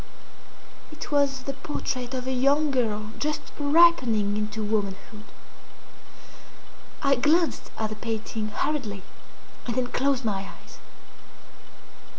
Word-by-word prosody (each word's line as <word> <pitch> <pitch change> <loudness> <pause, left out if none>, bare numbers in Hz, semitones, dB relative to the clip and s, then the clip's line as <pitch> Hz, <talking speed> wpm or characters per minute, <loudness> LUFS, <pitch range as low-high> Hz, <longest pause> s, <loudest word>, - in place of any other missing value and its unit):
It 305 - -8
was 280 -2 +2
the 275 - -3
portrait 265 -2 -3
of 255 -1 -3
a 260 - -1
young 280 +4 +3
girl 215 -5 0
just 300 0 -2
ripening 285 -10 +4
into 215 +1 -2
womanhood. 210 0 -3 1.8
I 275 -1 +5
glanced 310 +6 +2
at 215 -1 -2
the - - -3
painting 220 0 -3
hurriedly, 215 -4 -2 0.6
and 235 - -1
then 255 - +1
closed 270 -2 +1
my 195 -2 -2
eyes. - - -15
250 Hz, 115 wpm, -26 LUFS, 215-280 Hz, 1.8 s, I